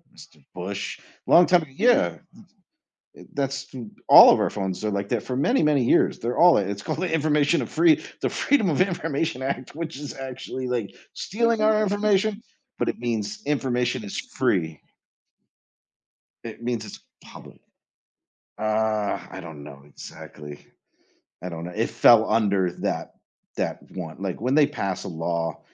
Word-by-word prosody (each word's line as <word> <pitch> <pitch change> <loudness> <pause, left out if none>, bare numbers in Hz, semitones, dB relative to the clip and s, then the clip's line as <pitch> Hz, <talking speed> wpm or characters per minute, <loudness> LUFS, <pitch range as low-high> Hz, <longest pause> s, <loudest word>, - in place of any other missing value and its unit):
Mr. 75 - -17
Bush, 100 +2 -5 0.3
long 175 - +7
time 175 -2 +3
yeah, 240 - +3
m 180 - -33 0.9
th - - -15
to - - -27
that's 135 -1 -3 0.3
all - - +10
of - - +2
our - - +1
phones 95 -1 -4
are 105 - 0
like 100 -1 -3
that 120 -1 -1
for 125 - -4
many, 240 - +2
many 150 -3 +3
years, - - +2
they're 120 +2 -3
all 175 0 +7
it's 100 0 -3
called 155 +5 -4
the 180 -3 -2
Information 150 0 +2
of - - -8 0.5
the - - 0
Freedom 260 -9 +1
of 150 - -1
Information 165 -7 -1
Act, 130 0 -4
which 165 -1 -5
is 145 -1 -7
actually, 130 -1 -6
like, 115 -6 -3 0.2
stealing 230 +2 0
our 215 0 +3
information, 205 +1 +1 0.4
but - - 0
it - - -3
means 110 -4 -3
information 125 -5 -1
is 100 - -6 0.2
free. 80 -4 0 1.6
It 115 0 -9
means 120 -2 -3
it's 105 - -10 0.2
public, - - -14 1.0
uh, 110 -1 0
I - - -8
don't 80 -3 -10
know 70 -1 -12
exactly, 75 0 -11 0.8
I 90 - -4
don't 85 -1 -7
know 90 - -7
it 115 +2 -1
fell 115 -1 +5
under 100 -5 +2
that - - -4 0.4
that - - -3
one, 85 -4 -7
like 95 -2 -4
when 125 +4 0
they 150 -1 +5
pass 95 -6 -4
a - - -5
law, 85 -1 -3
120 Hz, 160 wpm, -24 LUFS, 100-155 Hz, 1.6 s, all